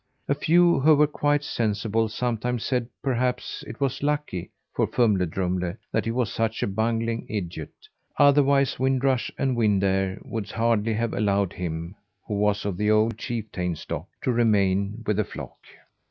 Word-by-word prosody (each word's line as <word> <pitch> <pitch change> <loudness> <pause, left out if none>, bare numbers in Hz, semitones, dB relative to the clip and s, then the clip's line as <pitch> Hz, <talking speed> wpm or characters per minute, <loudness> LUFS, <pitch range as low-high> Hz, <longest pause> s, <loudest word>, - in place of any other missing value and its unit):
A - - +3
few, 170 +2 +4
who 155 +3 +6
were 150 +1 +5
quite 145 0 0
sensible, 110 -2 0
sometimes 120 +1 -2
said 125 -3 0 0.2
perhaps 125 +2 -1
it - - -8
was 135 -2 -1
lucky 145 - -2 0.2
for - - +1
Fumle 105 -7 +2
Drumle 90 +1 -2 0.2
that - - 0
he - - -1
was 120 -2 -1
such 115 -1 -1
a - - +1
bungling 115 +3 -1
idiot, 85 -7 -4 0.5
otherwise 140 -1 +4
Wind 130 0 +1
Rush 130 -3 +1
and 135 -2 0
Wind 105 -4 +2
Air 95 0 +1
would 110 -3 -4
hardly 115 0 +1
have 115 +1 -1
allowed 100 -3 +1
him 85 -1 -4 0.3
who - - -3
was 105 0 +1
of 100 -3 -2
the 105 +2 +1
old 110 +1 +2
chieftain 105 -8 -3
stock - - -6 0.2
to 130 - +2
remain 105 -2 +2
with 105 - 0
the 105 - +3
flock. - - -9
115 Hz, 170 wpm, -25 LUFS, 100-130 Hz, 0.5 s, who